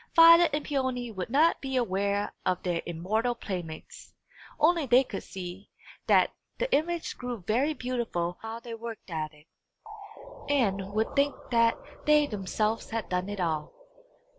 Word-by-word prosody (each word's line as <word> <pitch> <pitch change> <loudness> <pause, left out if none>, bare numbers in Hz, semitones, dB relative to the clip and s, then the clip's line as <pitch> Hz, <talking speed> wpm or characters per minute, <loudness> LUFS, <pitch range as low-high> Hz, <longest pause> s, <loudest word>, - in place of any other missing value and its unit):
Violet 335 +1 +9
and 295 +1 -2
Peony 260 -4 -1
would 190 -2 -5
not 300 +7 +3
be 265 -1 -3
aware 200 -3 0
of 185 -1 0
their 175 -2 0
immortal 215 +9 -1
playmates 175 -8 -7 0.4
only 320 -1 +3
they 250 +2 +6
could 205 -6 -6
see 185 +1 -8 0.4
that - - +5 0.3
the - - -1
image 335 +2 -1
grew 245 -5 -5
very 265 +9 +1
beautiful 230 -10 -2
while 225 +1 -6
they 235 0 -8
worked 225 -4 -8
at 155 -2 -3
it, 150 -1 -20 1.0
and 200 -9 +1
would 220 +1 -1
think 280 0 +2 0.2
that 230 -1 +4 0.3
they 300 0 +6
themselves 215 -1 -2
had 225 -2 -3
done 180 +2 -1
it 205 -1 -5
all. 160 -4 -2
225 Hz, 150 wpm, -28 LUFS, 190-270 Hz, 1.0 s, Violet